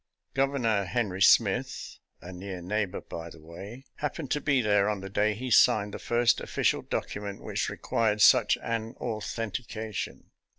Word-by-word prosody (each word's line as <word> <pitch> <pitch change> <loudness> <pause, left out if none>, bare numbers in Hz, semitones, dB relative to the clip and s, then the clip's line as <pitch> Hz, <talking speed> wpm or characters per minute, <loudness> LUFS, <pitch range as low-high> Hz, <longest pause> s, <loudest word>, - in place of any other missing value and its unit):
Governor 130 -7 +1
Henry 95 -1 -2
Smith - - +3
— - - -44
a 90 +2 -8
near 95 0 -6
neighbor, 100 +2 -2
by 85 0 -7
the 85 - -13
way 95 - -10
— - - -20
^happened 150 -1 -3
to 150 - +1
be 140 -2 +2
there 105 -3 +3
on 105 -2 -2
the 95 0 -8
day 105 +1 +1
he 125 +3 -5
signed 100 -1 +5
the - - -5
first 120 0 +2
official - - 0
document 100 -1 -4
which - - -2
required 110 -2 0
such - - +6
an 115 0 -3
authentication. 110 -1 -5
105 Hz, 165 wpm, -28 LUFS, 100-120 Hz, -, such